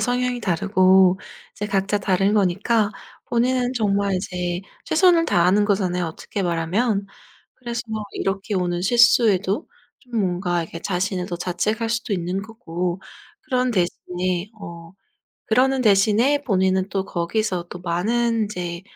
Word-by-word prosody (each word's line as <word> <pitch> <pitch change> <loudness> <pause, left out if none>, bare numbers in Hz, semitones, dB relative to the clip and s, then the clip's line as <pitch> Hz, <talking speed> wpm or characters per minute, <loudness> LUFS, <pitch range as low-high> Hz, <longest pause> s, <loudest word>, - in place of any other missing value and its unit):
성향이 250 0 0
다르고 185 0 +3 0.3
이제 210 - -4
각자 200 +1 0
다른 195 +1 +1
거니까 205 +2 +2 0.4
본인은 250 +1 +1
정말 200 -3 +1
이제 180 -1 -3 0.2
최선을 335 0 +4
다하는 185 - +3
거잖아요 185 -4 0
어떻게 190 +4 -5
말하면. 195 +5 0 0.5
그래서 240 -2 -5 0.3
이렇게 195 +1 -2
오는 175 -1 -1
실수에도 230 - +3 0.3
좀 245 -4 -6
뭔가 175 -2 -1
이렇게 165 +1 -8
자신을 185 -1 -1
더 175 - -4
자책할 210 +6 -2
수도 230 -2 -1
있는 180 +2 -2
거고 180 -5 -4 0.4
그런 255 -1 0
대신에 180 0 -2
어 170 -3 -10 0.5
그러는 260 +3 +2
대신에 220 +7 +3
본인은 190 -3 +1
또 195 -1 -1
거기서 180 0 -2
또 180 - -8
많은 220 +6 0
이제 175 -3 -5
195 Hz, 295 characters per minute, -22 LUFS, 180-230 Hz, 0.5 s, 최선을